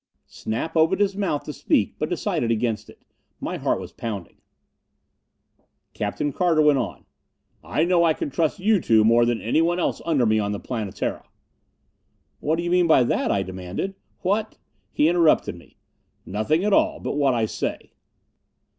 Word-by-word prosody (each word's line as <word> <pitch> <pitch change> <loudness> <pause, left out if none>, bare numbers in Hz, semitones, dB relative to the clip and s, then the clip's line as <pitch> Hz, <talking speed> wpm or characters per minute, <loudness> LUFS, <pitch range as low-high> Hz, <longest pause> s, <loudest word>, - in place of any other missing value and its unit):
Snap 120 +10 -5
opened 160 +3 +3
his 200 -1 +1
mouth 195 -8 -1
to 150 - -6
speak - - +1
but - - -1
decided 115 - -1
against 115 -1 -1
it. - - -17 0.4
My - - -4
heart - - 0
was - - -8
pounding. 105 -6 -6 1.6
Captain 145 -1 -2
Carter 170 -4 +2
went 150 -2 +4
on, 115 - -5 0.6
"I 155 - 0
know 175 -1 +3
I 160 -2 +3
can 145 - -4
trust 160 +5 0
you 200 0 +2
two 110 -1 +4
more 115 +2 +5
than 120 -1 0
anyone 165 +9 +1
else 180 - -1
under 155 -7 +2
me 110 0 +3
on 105 -1 -1
the 100 - -4
Planetara 110 -6 -4 0.6
" - - -46
"What 155 +2 0
do 170 - -3
you 175 - -2
mean 180 -1 +4
by 155 -5 +5
that?" - - 0
I 100 - +1
demanded. 95 - -5 0.3
"What 210 +4 -1 0.2
" - - -45
He 150 - +2
interrupted 170 -2 +3
me. - - -17 0.5
"Nothing 110 - 0
at 210 - +2
all 315 0 +2
but - - -3
what 140 -3 +2
I 115 -2 +1
say." - - -4
150 Hz, 175 wpm, -23 LUFS, 115-175 Hz, 1.6 s, more